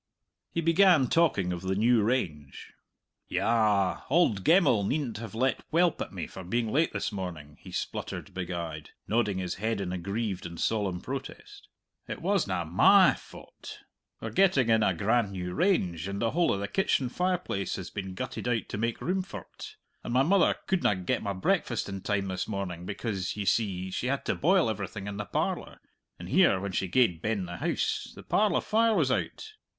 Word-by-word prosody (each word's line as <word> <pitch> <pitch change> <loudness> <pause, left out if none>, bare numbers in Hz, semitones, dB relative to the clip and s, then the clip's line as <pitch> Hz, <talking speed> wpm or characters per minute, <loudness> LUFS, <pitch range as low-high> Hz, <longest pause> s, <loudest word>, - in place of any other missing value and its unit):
He 170 - -1
began 165 -5 +5
talking 100 - +2
of 85 - -5
the 95 0 -1
new 115 +3 +4
range. 85 - -2 0.5
"Yah! 105 -5 +2
Auld 130 - +3
Gemmell 155 - +4
needn't 125 0 -2
have 110 -2 -8
let 130 +3 +1
welp 170 +1 +2
at - - -4
me - - -5
for 95 - -9
being 115 +4 -1
late 155 +6 +2
this - - -2
morning," 85 -7 -7
he - - -11
spluttered - - -5
big 90 -2 -4
eyed, 80 -4 -5 0.2
nodding 105 -3 +1
his 90 -2 -2
head 110 -1 0
in 90 -2 -3
aggrieved 100 +1 -3
and 85 -1 -9
solemn 100 -5 0
protest. 400 - -7 0.4
"It - - -5
wasna 100 - 0
my 80 +3 +6
faut! - - -12 0.4
We're - - -5
getting 180 -11 +3
in 110 -1 +4
a 95 -4 +2
grand 105 +2 +1
new 90 -1 -4
range, 95 - +1
and 100 0 -4
the 115 -1 +1
whole 175 +1 +2
of 100 - -1
the 100 - -3
kitchen 140 - +1
fireplace 180 - -1
has 95 - -7
been 95 -2 -5
gutted 95 - -5
out 120 -2 -1
to 100 - -4
make 115 +1 -2
room 185 +2 0
for't; 185 - -9 0.3
and - - -5
my 130 +2 +4
mother 190 +5 +4
couldna 175 - +2
get 90 -1 -1
my 100 - -2
breakfast 95 - 0
in 95 -1 -5
time 100 0 -1
this 95 -1 -3
morning, 95 -4 -4
because, 100 -2 -3
ye 105 - -3
see, 95 -4 0
she 120 - -2
had 135 +1 -1
to - - +1
boil 180 0 +3
everything 100 -2 -4
in 100 0 -5
the 105 - -4
parlour - - -2 0.4
and - - -9
here, 95 - +4
when 100 +1 -4
she 95 +1 -1
gaed 90 -5 +2
ben 105 -3 -1
the 85 0 -7
house, - - -1
the - - -11
parlour 210 -3 +2
fire 225 +1 +2
was - - +2
out! 435 0 -3
105 Hz, 190 wpm, -28 LUFS, 95-135 Hz, 0.5 s, my